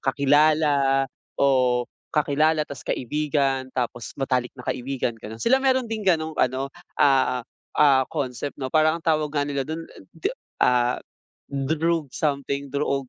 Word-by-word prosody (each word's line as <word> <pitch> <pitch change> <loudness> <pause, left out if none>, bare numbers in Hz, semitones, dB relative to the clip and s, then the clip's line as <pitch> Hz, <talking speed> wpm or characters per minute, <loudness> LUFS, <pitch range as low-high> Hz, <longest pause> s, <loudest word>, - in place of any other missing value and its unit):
kakilala 140 0 +3 0.3
o, 125 -3 +3 0.2
kakilala 150 +1 +2
ta's 140 -4 -9
kaibigan, 140 -1 -1
tapos 120 -2 -3
matalik 130 -2 0
na 125 - -10
kaibigan, 130 0 -2
ganon. 110 +1 -8
Sila 255 - +3
meron 260 -1 +2
ding 225 -1 -4
ganong 165 -5 +1
ano, 130 +2 0 0.2
ah, 130 -3 +3 0.3
ah, 135 -3 +5
concept 140 -2 -4
no 130 -1 -5
parang 155 0 +4
ang 170 - -12
tawag 155 -2 +2
nga 145 - +2
nila 140 -1 -3
dun 160 +1 -4
a - - -16 0.2
d - - -19 0.4
ah, 125 0 +3 0.5
droog 155 +3 0
something 140 -1 -2
dro-og 140 -2 -1
140 Hz, 140 wpm, -24 LUFS, 130-155 Hz, 0.5 s, ah